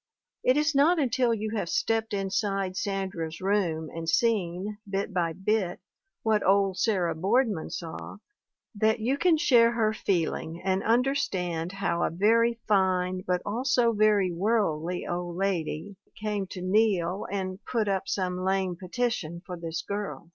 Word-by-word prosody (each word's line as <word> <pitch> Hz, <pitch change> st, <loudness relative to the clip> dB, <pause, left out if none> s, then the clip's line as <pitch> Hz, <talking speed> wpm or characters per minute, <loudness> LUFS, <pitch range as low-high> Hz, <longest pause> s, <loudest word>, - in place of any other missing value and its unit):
It 255 Hz, +2 st, +4 dB
is 300 Hz, +1 st, +2 dB
not 300 Hz, +6 st, +4 dB
until 255 Hz, -4 st, +2 dB
you 220 Hz, 0 st, -2 dB
have 200 Hz, -6 st, -2 dB
stepped 225 Hz, 0 st, 0 dB
inside 195 Hz, -1 st, -1 dB
Sandra's 185 Hz, -4 st, -3 dB
room 185 Hz, -5 st, 0 dB
and 165 Hz, 0 st, -4 dB
seen, 205 Hz, 0 st, 0 dB
bit 195 Hz, +1 st, -2 dB
by 170 Hz, -2 st, +1 dB
bit, 190 Hz, 0 st, -1 dB, 0.4 s
what 220 Hz, -2 st, +2 dB
old 195 Hz, -1 st, +3 dB
Sarah 185 Hz, -7 st, +1 dB
Boardman 200 Hz, +2 st, +1 dB
saw, 165 Hz, +3 st, -7 dB, 0.6 s
that 220 Hz, +2 st, +2 dB
you 245 Hz, +5 st, +1 dB
can 330 Hz, +2 st, +3 dB
share 240 Hz, -7 st, +5 dB
her 220 Hz, -2 st, +1 dB
feeling 170 Hz, -4 st, -1 dB
and 190 Hz, 0 st, +1 dB
understand 195 Hz, -9 st, 0 dB
how 175 Hz, -3 st, -1 dB
a -, -, +2 dB
very 230 Hz, +6 st, +2 dB
fine 185 Hz, -2 st, +2 dB
(but 180 Hz, 0 st, 0 dB
also 240 Hz, +2 st, +2 dB
very 210 Hz, -3 st, +3 dB
worldly) 180 Hz, -3 st, 0 dB
old 175 Hz, 0 st, -3 dB
lady 190 Hz, 0 st, -2 dB, 0.2 s
came 205 Hz, -2 st, -2 dB
to 180 Hz, -1 st, -7 dB
kneel 190 Hz, -2 st, +1 dB
and 190 Hz, 0 st, -4 dB
"put 225 Hz, -4 st, -1 dB
up 195 Hz, -1 st, -1 dB
some 185 Hz, -2 st, -1 dB
lame 190 Hz, -1 st, 0 dB
petition 185 Hz, -3 st, -3 dB
for 180 Hz, -1 st, -6 dB
this 165 Hz, -1 st, -5 dB
girl." 200 Hz, -4 st, -5 dB
195 Hz, 145 wpm, -27 LUFS, 180-220 Hz, 0.6 s, share